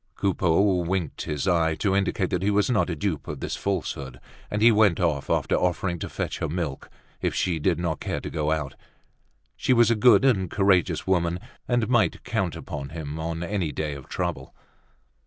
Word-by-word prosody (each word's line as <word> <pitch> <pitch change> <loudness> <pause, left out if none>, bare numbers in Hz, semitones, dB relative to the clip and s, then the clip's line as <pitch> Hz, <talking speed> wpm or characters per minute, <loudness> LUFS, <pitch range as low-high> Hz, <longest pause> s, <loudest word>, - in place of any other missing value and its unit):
Coupeau 95 0 +2
winked 90 -2 -2
his 75 +3 -2
eye, 80 -3 +2
to 95 +1 0
indicate 95 -1 0
he 100 - +1
was 105 +4 +2
not 105 - +2
a 85 - -2
dupe 80 -1 -3
of - - -5
this - - -3
falsehood; 70 -9 -3 0.3
and 105 +1 -1
he 115 - +8
went 105 -5 +4
off, 80 -6 0
after - - +1
offering 90 -1 0
to - - -5
fetch - - -4
her 80 - -2
milk, 80 -4 -4 0.3
if - - -1
she 85 -3 0
did 85 +3 +1
not 85 -3 -2
care - - -3
to - - -7
go 75 -1 -1
out: 75 -3 -1 0.8
she 130 - +1
was 120 -1 +5
a - - +3
good 125 +4 +5
and 95 -9 +2
courageous 95 -2 +2
woman, 85 -2 +1 0.3
and 120 -3 +1
might 120 -3 +2
count 100 -9 -1
upon 75 -4 -6
him 80 -2 -6
on 80 +1 -3
any 90 -3 -1
day 75 -1 -3
of 70 -2 -10
trouble. 85 -7 -4
90 Hz, 195 wpm, -25 LUFS, 80-100 Hz, 0.8 s, he